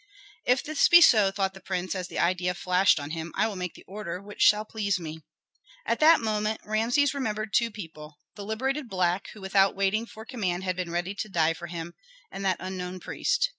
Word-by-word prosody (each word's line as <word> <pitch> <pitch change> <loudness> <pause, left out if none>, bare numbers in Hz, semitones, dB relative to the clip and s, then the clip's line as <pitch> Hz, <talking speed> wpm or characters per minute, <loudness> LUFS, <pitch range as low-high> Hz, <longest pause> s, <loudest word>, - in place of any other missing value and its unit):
"If 250 +1 +3
this 310 -1 +2
be 345 - +9
so," 215 - +6
thought 195 -1 -1
the 190 - -12
prince, 185 -1 -3
as 185 -2 -4
the - - -8
idea 180 +1 +1
flashed 180 -1 +3
on 145 +1 -6
him, 165 0 -5
"I - - +2
will 215 - -5
make 180 -2 -5
the - - -14
order 190 -3 -6
which 205 +1 -10
shall 210 +1 +5
please 205 -3 -1
me." 160 -1 -7 0.7
At - - 0
that 315 +1 +7
moment 215 0 -1
Rameses 235 +7 +2
remembered 215 -5 -3
two 235 -1 +3
people, 160 -7 -10 0.2
the 205 - -8
liberated 260 +6 -2
black 185 0 0
who 210 - -12
without 195 0 +3
waiting 200 +4 0
for 220 0 -11
command 190 -8 -2
had 185 -1 -1
been 180 -1 -4
ready 175 +3 -2
to 215 +1 -5
die 165 -3 +2
for 170 +1 -8
him, 170 0 -6 0.4
and 195 - -6
that 190 -2 +1
unknown 185 -1 -5
priest. 485 - 0
195 Hz, 210 wpm, -27 LUFS, 180-220 Hz, 0.7 s, be